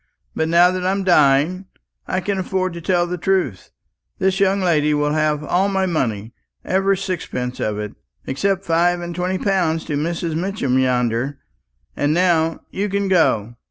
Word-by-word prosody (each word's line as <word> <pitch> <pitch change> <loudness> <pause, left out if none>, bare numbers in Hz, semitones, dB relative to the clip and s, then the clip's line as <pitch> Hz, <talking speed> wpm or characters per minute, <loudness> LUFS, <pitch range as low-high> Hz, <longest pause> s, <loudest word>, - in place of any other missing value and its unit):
But 160 - 0
now 175 +2 +5
that 185 0 -3
I'm 195 +2 0
dying, 165 +2 +3 0.4
I 185 - -1
can 200 0 -2
afford 185 -1 -1
to 170 - -7
tell 175 0 +1
the 175 0 -4
truth. 175 - -1 0.5
This 190 +1 +1
young 195 0 +3
lady 150 -5 +2
will 145 0 0
have 155 -1 0
all 180 +7 +1
my 190 -1 0
money, 115 - -2 0.3
every 195 +1 +1
sixpence 170 -10 -4
of 105 -1 -2
it, 105 -1 -5 0.3
except 195 +8 -1
five 175 +2 +2
and 175 0 -5
twenty 180 +2 -1
pounds 175 -5 0
to 155 - -4
Mrs. 165 +2 -2
Mitchin 165 -7 0
yonder. 125 +1 0 0.6
And 145 +2 +1
now 165 -2 +2
you 205 +2 -2
can 200 0 -1
go. 120 - +2
175 Hz, 165 wpm, -20 LUFS, 145-190 Hz, 0.6 s, now